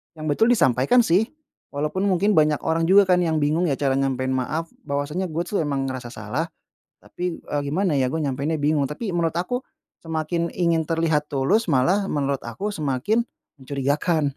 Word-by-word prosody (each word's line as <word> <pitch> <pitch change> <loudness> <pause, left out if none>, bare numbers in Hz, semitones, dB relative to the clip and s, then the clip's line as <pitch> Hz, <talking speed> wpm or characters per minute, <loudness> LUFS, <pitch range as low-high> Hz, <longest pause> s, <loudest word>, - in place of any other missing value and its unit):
yang 155 - -7
betul 220 +9 +3
disampaikan 135 - +4
sih. 195 +4 +3 0.4
Walaupun 150 +6 -2
mungkin 195 +2 +2
banyak 150 -1 +3
orang 165 +1 +1
juga 195 +1 +6
kan, 180 -1 +4
yang 160 -2 +1
bingung 150 +4 +1
ya 140 - +1
cara 135 -2 +1
nyampein 130 -1 0
maaf, 155 +6 -2 0.2
bahwasany,a 150 +4 -2
"Gue 165 +2 -1
tuh 200 - 0
emang 140 -2 -1
ngerasa 130 -2 -5
salah, 115 +9 -3 0.6
tapi, 180 -2 -4
eee, 145 - -3
gimana 170 +2 +1
ya, 130 -2 +2
gue 160 - -1
nyampein 140 +1 -1
bingung." 145 -1 +1
Tapi 195 - -4
menurut 165 -1 0
aku, 245 +9 -2 0.4
semakin 165 +1 -2
ingin 170 -2 +2
terlihat 160 -2 +1
tulus 180 +12 +1
malah, 165 +10 +2
menurut 140 -2 -1
aku 190 - -4
semakin 150 - 0 0.4
mencurigakan. 140 +2 0
155 Hz, 170 wpm, -23 LUFS, 140-175 Hz, 0.6 s, juga